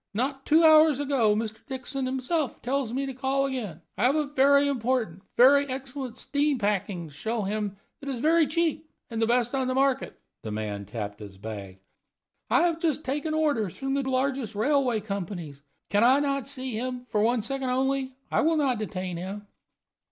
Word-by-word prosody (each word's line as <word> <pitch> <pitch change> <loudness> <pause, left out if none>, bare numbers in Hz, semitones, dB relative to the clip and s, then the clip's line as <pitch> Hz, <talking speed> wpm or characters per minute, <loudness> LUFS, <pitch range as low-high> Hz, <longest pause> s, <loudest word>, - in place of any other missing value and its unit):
Not 270 +4 -2
two 320 +2 +5
hours 310 -3 +7
ago 265 -7 +2
Mr. 220 0 -4
Dixon 265 0 -4
himself 265 +3 -1
tells 260 -2 -1
me 270 +3 -1
to 270 - -4
call 270 +1 0
again. 215 - -4 0.2
I 225 - +3
have 265 +4 +4
a 305 -1 +1
very 280 0 +4
important 240 -8 -1 0.2
very 280 +3 +6
excellent 260 -1 -5
steam 290 0 0
packing 200 -5 -1
to - - -16
show 220 +8 -2
him 205 0 -2 0.2
that 280 - -7
is 260 -3 -3
very 320 +3 +4
cheap 315 0 -1 0.2
and 225 0 -2
the 225 - +3
best 245 +1 +2
of 265 -1 0
the 255 - -1
market." 270 0 +1 0.2
The 110 - -6
man 105 -1 -4
tapped 105 0 -6
his 100 -2 -10
bag. 100 -2 -8 0.7
"I 345 - +4
have 335 -2 +1
just 315 -3 0
taken 295 +3 -1
orders 285 - 0
from 270 0 -2
the 280 - +1
largest 260 -4 -1
railway 250 0 +2
companies. 175 -8 -5 0.3
Can 205 0 +3
not 265 +5 +5
I 275 0 0
see 265 -2 -4
him, 250 +2 -4
for 210 - +2
one 230 0 +2
second 270 +2 -1
only? 265 +1 0 0.2
I - - +3
will 325 +1 +2
not 265 -6 +1
detain 185 -4 -4
him." 195 +4 -6
255 Hz, 190 wpm, -27 LUFS, 210-280 Hz, 0.7 s, hours